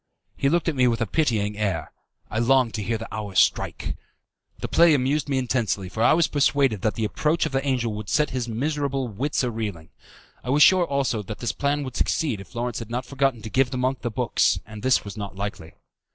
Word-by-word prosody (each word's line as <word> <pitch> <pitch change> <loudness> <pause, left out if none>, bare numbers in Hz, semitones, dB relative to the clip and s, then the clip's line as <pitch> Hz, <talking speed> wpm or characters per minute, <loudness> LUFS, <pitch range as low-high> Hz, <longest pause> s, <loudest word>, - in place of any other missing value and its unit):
He 140 - +1
looked 170 +3 +1
at 165 - +2
me 125 -1 +4
with 115 -1 +1
a 115 - +1
pitying 105 -6 0
air. 95 -7 -2 0.4
I 110 - -1
longed 125 -1 +3
to 110 - -3
hear 115 +3 -1
the 115 - -9
hour 105 -3 -5
strike. - - +1 0.6
The - - -4
play 170 -2 +5
amused 145 +3 0
me 135 - +1
intensely, 115 -7 -1
for 110 - -4
I - - +6
was 165 +1 +4
persuaded 140 -7 +2
that 105 -1 0
the 110 - -1
approach 155 +10 0
of 160 - -3
the 135 0 0
angel 125 -5 0
would 105 -1 -6
set 150 - +2
his 125 -2 -2
miserable 140 +2 -1
wits 135 +8 -1
a 125 - 0
reeling. 105 -8 -5 0.5
I 125 - -6
was 145 +3 +5
sure, 185 -2 +6
also, 135 -6 0
that 105 +1 -7
the 120 -1 -2
plan 145 +1 0
would 130 -2 -7
succeed 140 - 0
if 100 - -15
Lawrence 120 0 -2
had 115 -2 -8
not 125 +2 -3
forgotten 135 -3 0
to 110 - -5
give 130 -1 +2
the 130 - -4
monk 130 +1 -1
the 120 - -2
books, 120 -2 +1
and 110 0 -10
this 130 -2 +2
was 100 +1 -8
not 100 -2 -6
likely. 95 -5 -6
125 Hz, 230 wpm, -24 LUFS, 110-140 Hz, 0.6 s, I